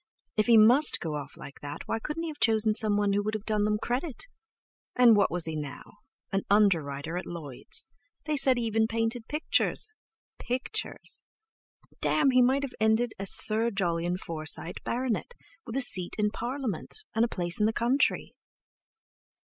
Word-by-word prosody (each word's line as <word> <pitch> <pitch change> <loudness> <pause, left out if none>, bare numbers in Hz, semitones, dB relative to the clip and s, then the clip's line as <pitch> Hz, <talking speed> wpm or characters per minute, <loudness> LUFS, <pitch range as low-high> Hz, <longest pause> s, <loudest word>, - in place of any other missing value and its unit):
If 215 +1 +1
he 235 -1 +6
must 245 +8 +6
go 160 -2 -4
off 145 -1 -7
like 140 - -11
that 145 0 -7
why 225 - -2
couldn't 300 +7 -5
he 335 - -3
have 300 - -9
chosen 220 -1 +3
someone 205 -2 +1
who 205 - +1
would 215 +1 -3
have 215 0 -6
done 210 -1 0
them 210 0 +1
credit! 250 +6 -4 0.7
And 240 -3 +6
what 200 -1 +3
was 175 -1 +2
he 160 -1 -3
now?—an 150 +6 -7
underwriter 165 -6 +1
at - - -9
Lloyd's; 150 -7 -1 0.4
they 305 -1 -1
said 265 -2 +3
he 240 - -1
even 220 0 +1
painted 225 +1 -2
pictures—pictures! 330 - -3 0.8
Damme! 290 -3 +2
he 255 0 +4
might 265 +3 +2
have 275 - -5
ended 220 +2 +2
as 195 0 0
Sir 225 +2 +5
Jolyon 175 -4 -1
Forsyte, 165 0 -4
Bart., 250 0 -1 0.5
with 230 - -6
a 270 - +1
seat 185 -8 +2
in 210 -1 +1
Parliament, 250 - -5
and 225 - +2
a - - +3
place 175 -4 -2
in 210 - +3
the - - +1
country! 245 +5 0
220 Hz, 165 wpm, -28 LUFS, 180-245 Hz, 0.8 s, he